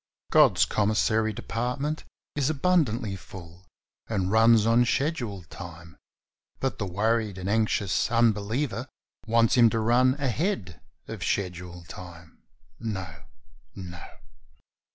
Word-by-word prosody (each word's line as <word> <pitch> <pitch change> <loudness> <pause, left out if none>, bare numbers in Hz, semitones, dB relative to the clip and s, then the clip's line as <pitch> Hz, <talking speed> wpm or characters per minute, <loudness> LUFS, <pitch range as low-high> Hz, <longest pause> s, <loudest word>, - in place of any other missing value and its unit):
God's - - +5
commissary 110 +1 +1
department 125 +8 -3 0.3
is 145 -1 +1
abundantly 135 - +1
full 90 -1 -12 0.4
and 95 -4 -1
runs 110 0 +5
on 115 +2 +4
schedule 120 - -1
time, 85 -1 -11 0.6
but 135 - -2
the 100 - -2
worried 105 +2 0
and 95 0 -5
anxious 105 -2 +1
unbeliever 115 +3 +1 0.4
wants 115 0 +3
Him 120 -3 +6
to 115 - -1
run 125 +4 +3
ahead 135 - -2 0.3
of - - -6
schedule 90 -2 -3
time. 85 -2 -12 0.4
No, 95 -9 -6 0.5
no 85 -3 -8
110 Hz, 110 wpm, -26 LUFS, 95-120 Hz, 0.6 s, Him